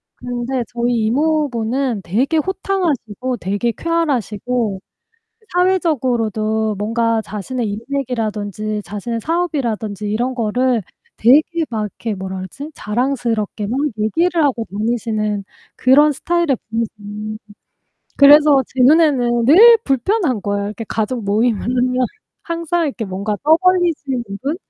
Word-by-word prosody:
근데 245 +1 -3
저희 240 -1 -1
이모부는 260 -4 0
되게 250 - 0
호탕하시고 305 - -2
되게 205 +4 -1
쾌활하시고 245 - -1 0.7
사회적으로도 240 - +1
뭔가 230 +1 0
자신의 215 +2 -4
인맥이라든지 215 -3 -3
자신의 230 +3 -4
사업이라든지 235 - -2
이런 245 +5 -1
거를 245 +1 0 0.3
되게 310 +8 +4
막 220 -2 -2
이렇게 210 +1 -4
뭐라 190 0 -6
그러지? 275 +11 -8
자랑스럽게 225 -2 -2
막 245 +5 -1 0.2
얘기를 330 +11 +1
하고 240 -5 0
다니시는 215 -1 -2 0.3
그런 290 +4 +5
스타일의 340 -2 0
분이세요. 215 -1 -4 0.8
그래서 290 -1 +7
제 260 - -5
눈에는 255 -5 +4
늘 430 - +8
불편한 275 - 0
거예요. 200 0 -1
이렇게 210 +2 -6
가족 225 +1 -2
모임을 215 +2 +1
하면 250 +1 0 0.5
항상 335 0 -1
이렇게 250 -5 -4
뭔가 200 +2 -3
떠벌리시는 320 -5 +2 0.2
분, 290 +5 -1
240 Hz, 305 characters per minute, -18 LUFS, 215-290 Hz, 0.8 s, 늘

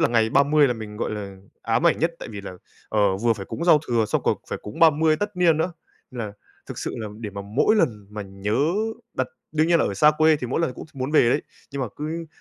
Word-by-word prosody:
là - - +4
ngày 115 -2 +2
30 145 +3 +4
là - - +1
mình, 105 -2 -8
gọi - - -2
là, 100 -2 -6 0.3
ám 115 +9 +1
ảnh 170 - +3
nhất 165 +1 +1
tại - - -8
vì 105 -2 -7
là, 100 - -8 0.4
ờ, 100 -3 +2
vừa 115 +4 +2
phải 100 -3 -7
cúng 170 - -4
giao 165 -4 +6
thừa 115 -2 +2
xong - - -1
còn - - +2
phải - - -3
cúng 105 +9 -8
30 160 -1 +5
tất 205 +1 -4
niên 170 -3 +4
nữa. 175 +3 -1 0.4
Nên 125 - -9
là 100 - -8 0.3
thực - - -7
sự - - -4
là 110 -2 -4
để 110 -2 -5
mà 100 0 -6
mỗi 115 - +2
lần 105 - 0
mà 105 0 -5
nhớ 100 +3 -3 0.6
đặt - - 0 0.3
đương 155 +1 +2
nhiên 170 -1 +5
là - - +2
ở 100 - -3
xa 150 +10 +6
quê 155 0 +5
thì 130 - -5
mỗi 130 - -1
lần 130 -7 -1
cũng - - -9
t 155 - -28
muốn 130 +2 -3
về 135 -6 +5
đấy, 145 - +1 0.3
nhưng 140 -1 -2
mà 125 - -2
cứ 160 +3 -4
125 Hz, 270 wpm, -24 LUFS, 105-155 Hz, 0.6 s, giao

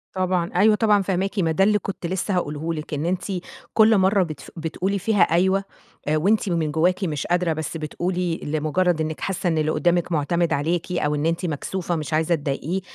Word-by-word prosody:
طبعًا 185 -2 0
أيوه 210 +4 +5
طبعًا 210 -2 +3
فاهماكِ، 195 +2 -1
ما 165 -3 +2
ده 175 +5 +2
اللي 210 +1 +3
كنت 195 -2 -6
لسه 190 +3 -2
هاقوله 160 -1 -2
لِك 155 -1 -6
إن 150 +2 -2
أنتِ 180 +1 -1 0.5
كل 220 0 +5
مرة 190 +1 +3
بتف 155 -4 -8
بتقولي 180 +5 -2
فيها 210 +1 +1
أيوه 190 +4 +2 0.4
آآ 155 +1 +2
وأنتِ 200 +5 +2
من 165 -3 0
جواكِ 180 +5 +1
مش 150 -6 -2
قادرة 175 -1 +1
بس 160 +1 -4
بتقولي 175 +2 -2
لمجرد 155 +3 0
إنِك 155 0 -3
حاسة 190 -1 -2
إن 160 - 0
اللي 155 0 +1
قدامِك 175 +1 +1
معتمد 165 +2 +1
عليكِ 165 +5 -1
أو 150 -4 0
إن 145 +1 -1
أنتِ 165 +2 0
مكسوفة 175 +3 -3
مش 155 -1 -4
عايزة 160 +2 +2
تضايقيه 150 +5 -3
175 Hz, 195 wpm, -23 LUFS, 155-190 Hz, 0.5 s, أيوه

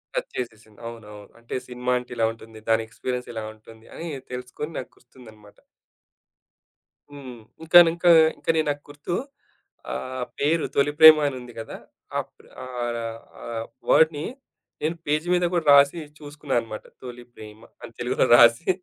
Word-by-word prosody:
Touch - - -3
చేసేసింది. 110 -3 -7
అవునవును. 105 -3 -11
అంటే, 115 - -7
సినిమా 125 0 -2
అంటే 125 - -13
ఇలా 115 - +2
ఉంటుంది. 110 -1 -14
దాని 115 0 +3
ఎక్స్‌పి‌రియన్స్ 125 +2 -5
ఇలా 110 -1 -4
ఉంటుంది 110 +1 -17
అని, 170 - -6 0.2
తెలుసుకొని 125 +5 -6
నాకు 125 - -9
గుర్తుందనమాట. 110 -5 -18 1.5
హ్మ్. 130 -4 -10 0.2
ఇంకానింక, 170 +1 +6 0.3
ఇంకా - - 0
నే 160 - +3
నాకు 145 0 -2
గుర్తు. 145 +4 -5 0.8
ఆ - - -3 0.4
పేరు 155 +3 +1
'తొలి 140 +1 +2
ప్రేమ' 160 -1 +10
అనుంది 125 -3 -7
కదా! 110 - -7 0.4
ఆ - - +2 0.2
ప్ర - - -22 0.2
ఆహ్, 125 -2 -4
ర - - -3 0.5
ఆహ్, 115 -1 -5 0.2
వర్డ్‌ని 155 -1 +4 0.6
నేను 160 +2 0
పేజీ 150 +3 0
మీద 175 0 +1
కూడా 170 -3 0
రాసి 140 +4 +5 0.2
చూసుకున్నా 145 -1 -5
అనమాట. 110 -2 -8 0.2
'తొలి 125 -1 -10
ప్రేమ' 110 +1 -13 0.2
అని 115 - -10
తెలుగు‌లో 125 +1 +1
రాసి 120 +8 +5
125 Hz, 145 wpm, -24 LUFS, 115-150 Hz, 1.5 s, ప్రేమ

